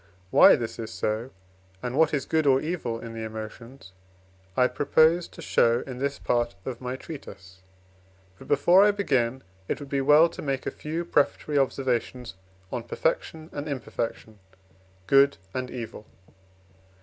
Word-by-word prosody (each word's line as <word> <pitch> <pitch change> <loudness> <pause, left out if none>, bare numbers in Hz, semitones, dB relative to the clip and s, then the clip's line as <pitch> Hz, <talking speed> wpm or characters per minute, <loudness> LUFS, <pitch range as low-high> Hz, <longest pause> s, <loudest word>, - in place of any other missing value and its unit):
Why - - +8
this 115 -1 -5
is 110 -1 -5
so, 110 +2 -2 0.5
and 125 0 -3
what 160 +1 +4
is 140 -4 -1
good 160 -2 +1
or 135 -1 +5
evil 145 -8 -3
in 115 0 -8
the 115 - -6
emotions, 110 +1 -9 0.7
I 125 - +5
propose 160 +6 +3
to - - -12
show 120 +1 +3
in 130 -2 -7
this 140 +1 -1
part 120 -3 0
of 125 -2 -5
my 125 0 -3
treatise. 95 - -11 0.8
But, - - -13
before 175 +7 +5
I 210 - +6
begin, 130 - 0 0.2
it - - -2
would 145 -2 -9
be 140 -1 0
well 150 +4 +6
to - - -9
make 135 -2 -2
a - - -2
few 165 +3 -4
prefatory 145 -1 +1
observations 125 -3 -1 0.4
on - - -2
perfection 160 0 -2
and 145 +1 -5
imperfection, 115 -5 -5 0.7
good 140 +6 +5 0.2
and 130 -1 -3
evil. 115 -4 -8
130 Hz, 155 wpm, -26 LUFS, 115-150 Hz, 0.8 s, Why